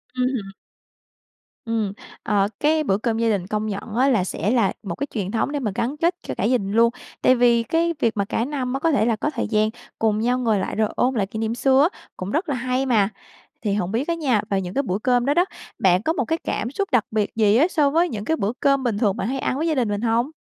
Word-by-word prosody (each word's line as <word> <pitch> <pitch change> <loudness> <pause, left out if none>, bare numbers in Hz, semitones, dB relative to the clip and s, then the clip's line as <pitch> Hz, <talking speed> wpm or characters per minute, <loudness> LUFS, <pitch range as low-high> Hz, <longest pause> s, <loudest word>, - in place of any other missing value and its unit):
Ừm 250 0 +1
hưm. 195 -4 -5 1.1
Ừm. 225 -4 -1 0.3
Ờ, 200 -1 +2
cái 310 +1 +2
bữa 195 -8 +1
cơm 225 0 -1
gia 230 0 +1
đình 195 -4 -1
công 215 0 -2
nhận 210 +1 -5
á, 265 +3 +3
là 220 -8 +3
sẽ 185 +2 -2
là 230 -6 +2
một 180 -5 -4
cái 285 - -3
truyền 200 -4 -2
thống 230 +5 0
để 290 - -1
mà 215 -6 -2
gắn 250 +6 -2
kết 340 +2 +1
cho - - -3
cả - - -3
gia 250 +4 +3
đình 195 -3 -4
luôn. 230 +2 +5 0.3
Tại 255 - +5
vì 235 -1 +4
cái 335 +7 +1
việc 225 -2 0
mà 200 - +1
cả 225 +3 -1
năm 260 -3 -3
á, 270 - -1
có 325 +3 +2
thể 270 -7 +2
là 230 -1 +2
có 255 - -1
thời 265 -7 -3
gian 215 0 +2 0.3
cùng 215 -1 +2
nhau 245 +3 +1
ngồi 225 -5 +1
lại - - -3
rồi 215 0 +1
ôn 255 +1 +1
lại 200 -4 0
kỷ 220 +2 -6
niệm 225 +1 -1
xưa 265 +2 +4
á, - - -19 0.2
cũng 185 +2 -5
rất 320 - -1
là 280 - 0
hay 255 +2 -1
mà. 215 -5 +3 0.5
Thì 205 -3 0
hổng 190 -3 -1
biết 235 +6 -1
á 340 - +1
nha, 270 -10 +1
vào 195 -1 +1
những 180 0 -5
cái 280 - +1
bữa 195 -6 -1
cơm 245 0 +2
đó 280 - +2
đó, 350 +4 +3 0.3
bạn 180 -1 +4
có 320 - +1
một - - -1
cái 325 0 0
cảm 235 +4 -2
xúc 395 +6 -2
đặc 245 -5 +3
biệt 215 -1 -1
gì 215 -1 +4
á, 300 +7 +5
so 300 -5 +2
với 335 +4 +2
những 210 -2 -5
cái 320 +5 0
bữa 205 +3 -1
cơm 275 -1 +2
bình 230 -5 0
thường 205 -4 +1
bạn 195 - -2
hay 270 +2 -2
ăn 260 - -1
với 320 +3 -1
gia 315 - +1
đình 245 -5 +1
mình 205 0 -2
hông? 235 +4 +1
235 Hz, 280 wpm, -22 LUFS, 210-270 Hz, 1.1 s, luôn